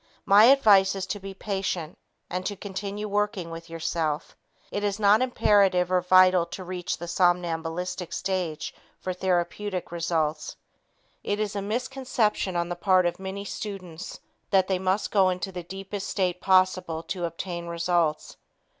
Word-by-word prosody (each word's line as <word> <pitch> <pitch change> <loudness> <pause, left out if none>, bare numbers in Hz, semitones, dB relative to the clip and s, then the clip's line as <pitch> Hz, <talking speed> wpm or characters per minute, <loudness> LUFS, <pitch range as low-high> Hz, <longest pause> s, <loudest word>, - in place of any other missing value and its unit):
My 205 +2 +7
advice 205 -7 +6
is 190 -1 -3
to 205 +2 -4
be 195 0 -8
patient 190 -5 -3 0.3
and 180 +1 -3
to 205 - -3
continue 200 +1 -5
working 205 -4 -1
with 165 +1 -8
yourself. 165 -2 -2 0.4
It 205 - -3
is 205 0 -1
not 210 +2 +5
imperative 195 -7 +3
or 180 -1 +3
vital 185 -1 +5
to 185 - -7
reach 180 -1 -4
the 175 - -7
somnambulistic 175 0 0
stage 180 -5 -2 0.3
for 185 - -3
therapeutic 185 +1 -2
results. 165 -3 -1 0.7
It 205 +1 -1
is 210 -1 -2
a 200 - -1
misconception 235 -3 -1
on 170 0 0
the 175 - -3
part 185 0 +3
of 175 - -1
many 190 +1 -5
students 185 -5 -7 0.3
that 190 -2 +3
they 190 -2 0
must 190 +2 0
go 195 -3 +4
into 180 +1 -3
the 180 -1 -5
deepest 195 +3 -6
state 180 -2 -1
possible 185 -3 +2
to 180 -1 -3
obtain 170 +1 -5
results. 170 -2 0
185 Hz, 155 wpm, -26 LUFS, 175-200 Hz, 0.7 s, My